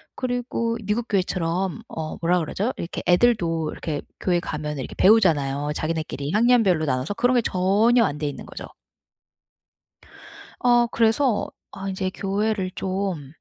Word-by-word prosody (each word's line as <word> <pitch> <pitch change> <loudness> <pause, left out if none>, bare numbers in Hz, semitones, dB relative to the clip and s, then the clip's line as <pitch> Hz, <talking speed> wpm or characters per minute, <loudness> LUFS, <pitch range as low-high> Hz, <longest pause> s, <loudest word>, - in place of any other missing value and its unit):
그리고 245 -2 -2
미국 225 +3 -1
교회처럼 185 0 -1
어 155 -1 -5
뭐라 175 +2 +2
그러죠? 195 +9 -2
이렇게 170 - -5
애들도 175 -6 +2
이렇게 150 -3 -4 0.2
교회 175 -2 +1
가면 150 -3 -4
이렇게 130 - -6
배우잖아요. 150 -9 +3
자기네끼리 155 -2 -3
학년별로 215 -8 +3
나눠서 130 +7 -1
그런 245 +3 +2
게 245 - +4
전혀 215 +5 +3
안 150 -6 -2
돼 150 - -2
있는 145 - -6
거죠. - - -8 1.9
어 240 -1 +4
그래서 230 +1 +1 0.2
'아 195 0 -6
이제 190 0 -2
교회를 195 -1 -1
좀 185 -7 -3
185 Hz, 315 characters per minute, -23 LUFS, 160-225 Hz, 1.9 s, 게